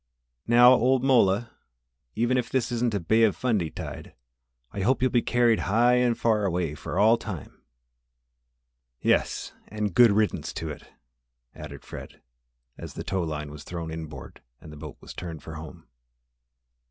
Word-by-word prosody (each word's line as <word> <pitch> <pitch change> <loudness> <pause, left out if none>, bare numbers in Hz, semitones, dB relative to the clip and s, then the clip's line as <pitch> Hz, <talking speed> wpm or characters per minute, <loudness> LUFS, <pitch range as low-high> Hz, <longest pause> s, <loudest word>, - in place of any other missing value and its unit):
"Now, 120 +2 +7
old 130 +1 +3
mola, 115 -4 +3 0.6
even 120 +4 +1
if 125 -2 -1
this 130 -3 -1
isn't 120 -2 0
a - - 0
Bay 110 +7 +2
of 110 -6 +4
Fundy 105 -5 0
tide, - - -8 0.6
I - - -6
hope 125 +7 +2
you'll 130 0 +1
be 120 - +3
carried 120 -2 +2
high 120 +4 +4
and 125 -2 +2
away 95 -8 +1
for 75 - -6
all 110 +4 +5
time." 95 -11 -8 1.4
"Yes, - - 0
and 105 -3 -3
good 120 +5 +7
riddance 105 +1 0
to 80 -2 -4
it!" - - -11 0.7
added - - -10
Fred, - - -10 0.6
as - - -8
the - - -5
tow 95 -1 -2
line 75 -3 -4
was 75 0 -10
thrown 85 -2 -6
inboard 80 -4 -8 0.2
and 75 - -12
the - - -10
boat 75 -1 -9
was - - -10
turned 85 -3 -7
for 80 - -8
home. 80 +1 -10
105 Hz, 160 wpm, -26 LUFS, 80-120 Hz, 1.4 s, Now